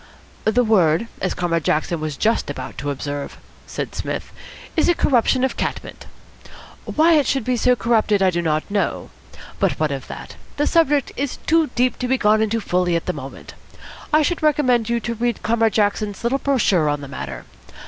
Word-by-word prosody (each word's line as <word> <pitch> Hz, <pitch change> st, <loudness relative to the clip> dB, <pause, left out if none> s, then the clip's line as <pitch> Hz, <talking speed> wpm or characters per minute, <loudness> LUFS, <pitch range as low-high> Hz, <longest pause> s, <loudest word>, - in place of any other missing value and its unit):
"The 230 Hz, +3 st, +3 dB
word, 185 Hz, -4 st, +3 dB, 0.2 s
as 190 Hz, -, -1 dB
Comrade 165 Hz, -2 st, -1 dB
Jackson 155 Hz, +3 st, 0 dB
was 155 Hz, -3 st, -4 dB
just 225 Hz, -6 st, +1 dB
about 130 Hz, -3 st, -6 dB
to 145 Hz, -, -3 dB
observe," 145 Hz, 0 st, -5 dB, 0.3 s
said -, -, -5 dB
Psmith, -, -, -4 dB, 0.4 s
"is 320 Hz, -, +3 dB
a 350 Hz, -, +4 dB
corruption 255 Hz, -2 st, +2 dB
of 265 Hz, -, 0 dB
cat -, -, -1 dB
mint. -, -, -11 dB, 0.8 s
Why 325 Hz, +2 st, +3 dB
it 295 Hz, -4 st, +3 dB
should 270 Hz, -3 st, 0 dB
be 250 Hz, +2 st, 0 dB
so 250 Hz, +1 st, +3 dB
corrupted 220 Hz, -3 st, +2 dB
I 190 Hz, -1 st, +3 dB
do 175 Hz, 0 st, -1 dB
not 155 Hz, +3 st, -1 dB
know. 200 Hz, -3 st, -1 dB, 0.5 s
But -, -, +2 dB
what 155 Hz, -2 st, +1 dB
of 135 Hz, -2 st, -5 dB
that? -, -, -9 dB, 0.2 s
The 295 Hz, -, +2 dB
subject 295 Hz, -4 st, +2 dB
is 280 Hz, -1 st, -3 dB
too 325 Hz, -1 st, +3 dB
deep 250 Hz, 0 st, +1 dB
to 250 Hz, -, -1 dB
be 260 Hz, +1 st, +2 dB
gone 215 Hz, -2 st, +3 dB
fully 180 Hz, -5 st, 0 dB
into 170 Hz, -, 0 dB
at -, -, -24 dB
the -, -, -1 dB
moment. 135 Hz, +1 st, -10 dB, 0.6 s
I 305 Hz, 0 st, +4 dB
should 345 Hz, +3 st, -1 dB
recommend 260 Hz, -7 st, +2 dB
you 235 Hz, 0 st, +1 dB
to 235 Hz, +2 st, -3 dB
read 235 Hz, 0 st, -2 dB
Comrade 225 Hz, -1 st, +2 dB
Jackson's 205 Hz, -1 st, 0 dB
little 255 Hz, +4 st, +1 dB
brochure 210 Hz, -, +2 dB
on 145 Hz, 0 st, -1 dB
the 140 Hz, -, -7 dB
matter. 65 Hz, -, -7 dB
220 Hz, 195 wpm, -21 LUFS, 165-255 Hz, 0.8 s, a